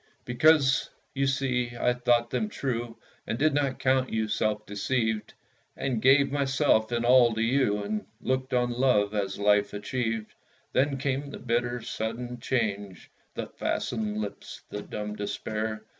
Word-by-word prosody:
Because, 135 +2 +4 0.2
you 135 0 +1
see, 125 -3 0
I 125 - +3
thought 120 -1 +2
them 215 - -1
true, 120 - -3 0.3
And 115 - -2
did 155 +3 +3
not 140 -2 0
count 130 0 +2
you 110 -1 -1
self 105 0 -1
deceived, 110 +1 -1 0.4
And 130 -5 -1
gave 135 +2 +5
myself 135 -5 +2
in 120 0 0
all 120 -2 +6
to 110 - -1
you, 115 -4 +2
And 105 +1 -3
looked 130 0 -1
on 125 -1 +1
Love 120 -5 +2
as 100 -2 -2
Life 105 0 +3
achieved. 115 0 -3 0.4
Then 140 +1 +2
came 135 +1 -2
the - - -7
bitter, 120 0 -1
sudden 120 +2 -4
change, 105 -6 -2 0.2
The - - -3
fastened 110 -3 -2
lips, 105 -1 -6
the 105 - -4
dumb 105 0 -5
despair. 110 +1 -3
120 Hz, 150 wpm, -27 LUFS, 110-130 Hz, 0.4 s, all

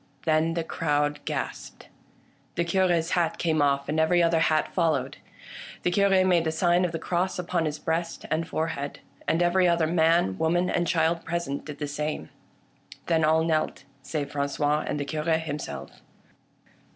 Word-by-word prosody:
Then 160 +1 +2
the 165 - -1
crowd 150 -2 0
gasped. - - -5 0.7
The 170 - +1
Cure's 170 -1 +1
hat 170 -2 +1
came 160 -3 +1
off, 140 -1 +1
and 155 +2 0
every 170 +2 +4
other 165 -1 +3
hat 155 -1 +1
followed. 155 -7 0 0.7
The 180 - +1
Cure 195 0 +4
made 175 -3 +3
the 160 - 0
sign 175 +2 +2
of 175 - -2
the 165 - -3
cross 180 +3 -1
upon 175 -2 -1
his 150 0 -2
breast 165 +2 -3
and 165 +1 0
fore 160 +1 -1
head, 140 0 -5 0.3
and 165 +2 +2
every 180 +1 +3
other 170 -2 +3
man, 160 - +2
woman, 175 +3 +1
and 175 - 0
child 165 0 +1
present 165 -5 -3
did 150 -2 -7
the 150 - -3
same. 145 - -4 0.7
Then 165 -2 +2
all 160 +1 +4
knelt, 155 -3 -1 0.2
save 145 0 -4
Franqois 145 +1 0
and 145 - -2
the 145 - -2
Cure 150 +2 -3
himself. 145 - -5
160 Hz, 170 wpm, -26 LUFS, 150-170 Hz, 0.7 s, every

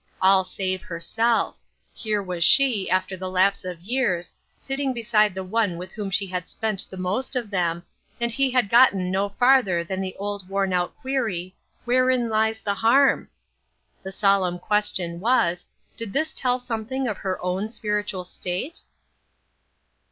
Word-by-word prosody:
All 190 0 +5
save 185 0 -3
herself; 225 +8 0 0.3
here 210 -2 -2
was 180 -2 -2
she, 240 -3 +5
after 185 +1 0
the 185 0 -5
lapse 190 +2 +2
of 180 -2 -6
years, 190 -6 -1 0.2
sitting 270 0 -2
beside 215 -4 +2
the 190 - -4
one 195 -2 0
with 180 +2 -8
whom 205 -2 -5
she 200 +1 0
had 180 -1 -5
spent 215 -3 -1
the 190 - -9
most 195 +10 -2
of 235 -4 -3
them, 175 -3 -1 0.4
and 235 0 0
he 270 +3 +1
had 250 -4 +2
gotten 200 -5 +4
no 195 +2 0
farther 205 -6 +3
than 190 +2 -4
the 190 -1 -4
old 200 -1 -5
worn 195 -1 0
out 180 -1 -1
query, 220 -10 -3 0.3
"Wherein 255 -1 +2
lies 220 0 0
the 200 - 0
harm?" 250 +7 +3 0.7
The 190 - -7
solemn 195 -3 +2
question 185 -4 -1
was, 180 -5 +1 0.3
Did 225 -4 -7
this 310 +3 0
tell 250 -1 0
something 245 +2 -3
of 210 -4 -3
her 190 -1 -3
own 185 +4 -2
spiritual 210 -4 -2
state 180 - -5
200 Hz, 160 wpm, -24 LUFS, 185-235 Hz, 0.7 s, All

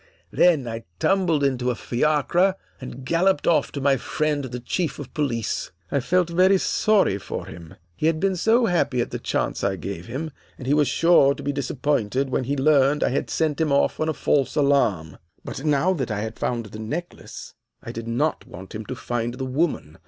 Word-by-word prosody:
Then 160 -8 +3
I 115 0 -6
tumbled 180 -7 +2
into 130 -2 +1
a 125 - 0
fiacre 155 - +1 0.2
and 130 0 -9
galloped 170 +2 +2
off 170 - +2
to 140 - -3
my 135 0 +3
friend 150 +3 -1
the 125 -1 -6
Chief 160 +7 -2
of 145 -4 -9
Police. 125 -8 -2 0.2
I 140 - +2
felt 180 +6 +1
very 185 +3 +4
sorry 195 - +2
for - - -6
him. 80 0 -11 0.2
He 155 - 0
had 160 -1 +1
been 195 +1 +1
so 225 +7 +3
happy 165 - +1
at 120 - -1
the - - -4
chance - - -2
I 100 -1 +1
gave 95 0 -6
him, 145 +7 -4 0.3
and 130 - -9
he 135 - +2
was 150 -2 +3
sure 165 -5 +4
to - - -9
be 145 - -1
disappointed 135 -2 -1
when 130 - 0
he 140 +3 -1
learned 140 0 +3
I - - +2
had 130 - -2
sent 155 -2 0
him 155 -2 +1
off 140 - +2
on 155 - 0
a - - 0
false 140 -3 +1
alarm. 135 - +1 0.3
"But 135 - -6
now 150 +5 +2
that 140 -9 -3
I 105 -1 -2
had 110 +1 -6
found 120 -2 -2
the 105 +1 -10
necklace, 155 +11 -7 0.3
I - - -6
did 115 0 -7
not 135 +7 -1
want 95 +1 -11
him 110 0 -6
to 130 - -4
find 120 0 -3
the 130 0 -4
woman. 130 - -2
140 Hz, 205 wpm, -23 LUFS, 120-160 Hz, 0.3 s, very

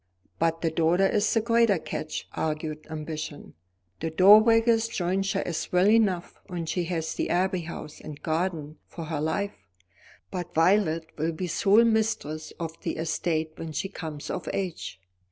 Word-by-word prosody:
"But 165 0 +1
the 165 - +1
daughter 165 +4 +3
is 205 +2 +2
the 225 - +3
greater 230 -3 +3
catch," 155 -1 -5
urged 155 -1 -3
Ambition. 155 -1 -6 0.5
"The 165 - -2
dowager's 225 +6 +6
jointure 195 -2 -1
is 170 -3 -4
well 180 +2 +4
enough, 210 -5 +2
and 170 -3 -4
she 175 +1 -1
has 165 -2 -2
the - - -2
Abbey 185 +1 +1
House 160 -2 -8
and 145 -1 -8
gardens 160 -2 -2
for 170 - -8
her 155 -2 -3
life, 160 - -2 0.6
but 180 -3 -5
Violet 165 -1 +3
will 165 +2 0
be 180 +4 -3
sole 200 +6 +4
mistress 220 -9 0
of 165 -1 -5
the - - -3
estate 160 0 -1
when 165 -1 -6
she 195 +6 -2
comes 155 -6 -6
of 180 - -4
age. 180 - -4
170 Hz, 155 wpm, -27 LUFS, 160-195 Hz, 0.6 s, dowager's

